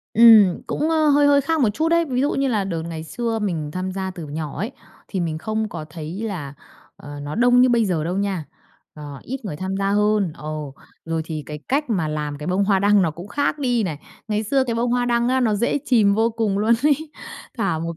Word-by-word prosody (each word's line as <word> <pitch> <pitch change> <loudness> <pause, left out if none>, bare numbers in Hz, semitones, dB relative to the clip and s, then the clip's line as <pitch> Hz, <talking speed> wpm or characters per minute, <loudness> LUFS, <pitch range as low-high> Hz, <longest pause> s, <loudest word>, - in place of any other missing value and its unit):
Ừm, 220 -5 +7
cũng, 310 +2 -1
ơ, 315 -2 +3
hơi 290 0 +5
hơi 285 0 +5
khác 315 +3 0
một 235 - +4
chút 320 +2 +1
đấy. 335 0 +3
Ví 255 -4 -1
dụ 285 - +2
như 275 0 0
là 210 -5 0
đợt 170 -4 -3
ngày 165 -1 -6
xưa 230 +7 -2
mình 165 -8 -2
tham 185 +2 -4
gia 190 0 -3
từ 170 -4 -8
nhỏ 150 0 -5
ấy, 220 +8 -3 0.4
thì 190 - -3
mình 160 -2 -2
không 220 +5 -2
có 160 -4 -6
thấy 165 +6 -6
là, 155 -10 -5 0.4
ờ, 145 0 -9
nó 145 +1 -5
đông 245 +2 +4
như 255 - +6
bây 235 -2 +3
giờ 170 -5 -1
đâu 180 +3 -2
nha, 195 -5 -1 0.5
ờ, 145 -3 -9
ít 265 -1 -6
người 150 -7 -4
tham 190 +3 -3
gia 195 0 0
hơn. 210 -4 +2
Ờ, 155 - -9 0.6
rồi 165 -1 -2
thì 155 -2 -5
cái 150 0 -6
cách 280 0 0
mà 170 -8 0
làm 150 -1 -3
cái 150 - -7
bông 185 +2 +1
hoa 195 -1 +3
đăng 205 0 +4
nó 165 - +1
cũng 175 +6 -10
khác 285 +5 -1
đi 245 -4 +1
này. 160 -7 -3 0.3
Ngày 210 0 0
xưa 265 +5 +1
cái 235 -3 -2
bông 235 +1 0
hoa 245 0 +1
đăng 235 0 +1
á 260 +1 +2
nó 220 -4 +2
dễ 235 +7 0
chìm 215 -6 +4
vô 225 +2 +2
cùng 220 -3 -1
luôn 225 +3 +3
ấy, 300 +1 +1 0.5
thả 195 -7 0
một 165 0 -4
205 Hz, 245 wpm, -22 LUFS, 165-245 Hz, 0.6 s, Ừm